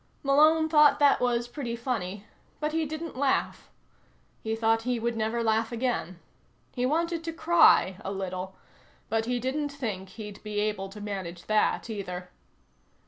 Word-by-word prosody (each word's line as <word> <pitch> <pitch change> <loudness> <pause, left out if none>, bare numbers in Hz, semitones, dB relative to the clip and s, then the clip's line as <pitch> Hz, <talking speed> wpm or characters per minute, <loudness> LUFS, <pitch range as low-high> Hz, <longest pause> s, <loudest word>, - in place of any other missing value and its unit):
Malone 310 +3 +5
thought 300 -2 +6
that 285 -1 +4
was 240 -1 +1
pretty 240 -2 -4
funny, 215 -5 -4 0.3
but 300 0 -1
he 320 0 0
didn't 315 +1 -6
laugh. 270 +1 0 0.7
He 220 0 -2
thought 225 0 +2
he 245 0 -1
would 235 +1 -1
never 225 +1 -1
laugh 225 +1 +1
again. 235 -8 -2 0.5
He 250 -1 0
wanted 335 +3 0
to 330 - -3
cry, 325 - +4
a 195 - -4
little, 190 -1 -5 0.5
but 225 0 0
he 245 +1 -1
didn't 285 +4 -2
think 215 -10 -5
he'd 210 0 -9
be 210 -1 -3
able 210 -2 -1
to 210 +2 -10
manage 190 -4 -6
that 215 +2 +1
either. 180 -4 -6
230 Hz, 155 wpm, -28 LUFS, 205-285 Hz, 0.7 s, thought